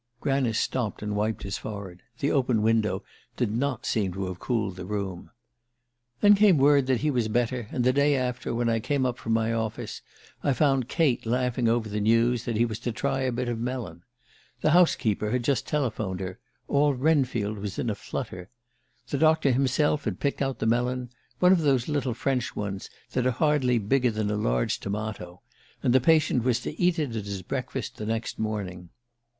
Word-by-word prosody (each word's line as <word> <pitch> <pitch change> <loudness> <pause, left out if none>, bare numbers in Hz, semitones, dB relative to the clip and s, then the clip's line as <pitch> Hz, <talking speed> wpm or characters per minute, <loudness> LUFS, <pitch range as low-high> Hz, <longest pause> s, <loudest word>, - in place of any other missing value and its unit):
Granice 135 -5 +1
stopped 115 -5 -2
and 105 0 -2
wiped 105 +1 -1
his 100 0 -4
forehead: 100 -4 -7 0.2
the 140 +4 0
open 125 -6 +2
window 110 -1 +1 0.3
did - - 0
not 130 +2 -1
seem 100 -4 0
to 95 +1 -3
have 90 -1 -6
cooled 110 -7 -1
the 90 - -7
room. 100 -4 -4 0.9
"Then 205 0 +8
came 200 -4 +5
word 140 -1 +4
that 130 -3 +1
he 150 - +1
was 120 -5 0
better; 120 +1 -1
and 125 - -1
the 130 +1 +3
day 140 +1 +3
after, 125 -1 -2
when 120 0 0
I 115 -1 +2
came 140 +3 0
up 125 -1 -2
from 115 - -1
my 115 0 +1
office, 110 -1 -3 0.4
I 140 - +2
found 135 -3 +2
Kate 155 -8 +1
laughing 125 0 +1
over 115 -1 +1
the 105 0 -3
news 115 +2 +2
that 120 - -2
he 120 - +4
was 110 -2 -4
to 120 0 -3
try 135 +3 -1
a 130 -1 0
bit 125 +1 -2
of 120 -2 -2
melon. 115 -9 -4 0.6
The 155 - +3
house 175 +1 +5
keeper 105 -1 -1
had 125 +2 0
just 135 +2 0
telephoned 110 -10 -1
her 95 +3 -5 0.3
all 145 0 +3
Wrenfield 125 -7 +1
was 100 -1 -5
in - - -2
a 110 - +1
flutter. 90 -2 -6 0.6
The 140 - -1
doctor 155 -3 +4
himself 140 +3 +1
had 100 -5 -2
picked 140 0 -1
out 135 -1 -1
the - - -2
melon, 125 +2 0 0.3
one 180 0 +5
of 185 -3 +4
the 145 -3 +4
little 140 -6 -1
French 130 0 -1
ones 100 -2 -4 0.2
that 125 0 +1
are 125 -2 -1
hardly 145 -6 +2
bigger 125 +4 +2
than 110 -2 -1
a - - 0
large - - 0
tomato 100 -4 -5 0.4
and 125 - +3
the 130 - +5
patient 155 -5 +3
was 125 -1 +2
to 150 - -5
eat 175 -1 +3
it 145 -7 -2
at 105 -2 -3
his 100 -2 -5
breakfast - - -4
the 105 - -5
next 115 +1 -3
morning. 95 -5 -4
120 Hz, 200 wpm, -26 LUFS, 105-135 Hz, 0.9 s, Then